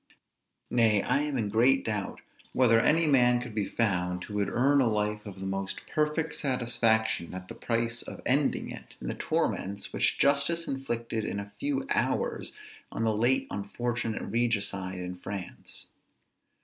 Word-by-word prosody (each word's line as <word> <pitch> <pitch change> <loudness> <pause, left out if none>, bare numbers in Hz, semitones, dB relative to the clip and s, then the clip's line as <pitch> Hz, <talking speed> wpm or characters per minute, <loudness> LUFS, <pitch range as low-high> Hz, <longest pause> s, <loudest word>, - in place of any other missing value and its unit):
Nay, 110 -4 +4
I - - +2
am 145 -2 -1
in 110 -4 0
great 120 +6 +3
doubt 105 -3 -2 0.3
whether 115 -3 +5
any 160 +7 +4
man 125 -4 +4
could 120 -2 -7
be 105 -2 -1
found, 90 -5 0
who 105 - -9
would 100 -1 0
earn 140 +5 +3
a 125 - +3
life 105 -1 0
of 95 -2 -9
the 95 - -5
most 95 0 -3
perfect 150 +1 0
satisfaction 115 - +1
at 95 0 -7
the - - -6
price 115 0 -1
of - - -7
ending 140 +2 +1
it - - -10
in - - -5
the - - -1
torments, 100 +1 -2
which - - +1
justice 140 +4 +3
inflicted 120 -4 -3
in 100 - -3
a 100 0 -8
few 280 -1 -1
hours - - +1 0.4
on - - -2
the 110 -1 +2
late 120 +5 +3
unfortunate 110 +3 -3
regicide 100 -4 -1
in 90 0 -5
France. 95 0 -7
115 Hz, 160 wpm, -29 LUFS, 100-130 Hz, 0.4 s, whether